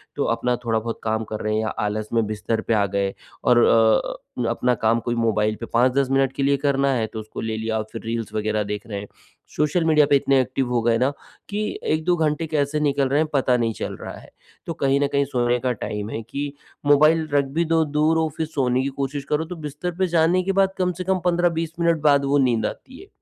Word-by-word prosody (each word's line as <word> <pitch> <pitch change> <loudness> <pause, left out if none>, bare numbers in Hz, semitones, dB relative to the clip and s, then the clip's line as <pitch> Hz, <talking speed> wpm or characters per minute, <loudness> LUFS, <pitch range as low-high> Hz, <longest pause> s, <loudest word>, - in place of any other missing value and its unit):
तो 145 - 0
अपना 125 +1 0
थोड़ा 115 -1 +1
बहुत 115 +1 -5
काम 110 0 -1
कर 110 - -4
रहे 110 0 -1
हैं 110 - +1
या 110 - -2 0.2
आलस 105 +1 -2
में 115 -1 +2
बिस्तर 110 +1 -2
पे - - -1
आ 105 -2 +3
गए 100 -1 0 0.3
और 125 - +4
अ, 110 +2 +1
अपना 125 0 +1
काम 115 +1 +1
कोई 120 0 0
मोबाइल 110 -2 +1
पे 115 - -5
5-10 130 +3 +3
मिनट 135 -1 +2
के 140 - -1
लिए 140 0 +3
करना 140 0 +2
है 115 -3 0
तो 110 - -4
उसको 110 0 -7
ले 110 -1 -3
लिया 110 0 -2
और 110 - -1
फ़िर - - -6
रील्स 115 -2 -3
वग़ैरह 110 0 0
देख 105 +2 -5
रहे 100 -2 -4
हैं। 100 - -8 0.5
सोशल 150 +3 +1
मीडिया 150 -2 +5
पे 140 - +5
इतने 135 0 +3
एक्टिव 130 0 -2
हो 120 -1 +1
गए 115 0 +2
ना 130 +4 +2 0.4
कि 210 +1 -2 0.2
1-2 160 +3 +1
घंटे 160 0 0
कैसे 150 -1 0
निकल 140 -2 +1
रहे 140 - +2
हैं 155 - 0
पता 130 -3 +2
नहीं 115 -2 0
चल - - -5
रहा - - -6
है। - - -16 0.4
तो 165 - -3
कहीं 140 -2 +1
न 145 - +3
कहीं 140 0 +2
सोने 125 -2 0
का 125 0 0
टाइम 105 +1 -4
है 115 - -4
कि 145 0 -3 0.3
मोबाइल 155 +2 +4
रख 140 -1 +3
भी 170 - +3
दो 165 0 +2
दूर 155 +2 +2
और 160 -1 +1
फ़िर 160 - -1
सोने 130 -4 0
की 140 - -1
कोशिश 140 +1 -3
करो 150 +2 0
तो 180 +2 -7
बिस्तर 150 +5 -4
पे 185 - +2
जाने 175 +3 +3
के 195 - 0
बाद 190 0 +1
कम 180 -1 +2
से - - -2
कम 190 +1 0
15-20 170 -2 +1
मिनट 170 -2 +2
बाद 140 -2 +4
वो 140 +1 +2
नींद 125 -5 +2
आती 260 0 -7
है। 390 - -14
135 Hz, 245 wpm, -23 LUFS, 115-155 Hz, 0.5 s, मीडिया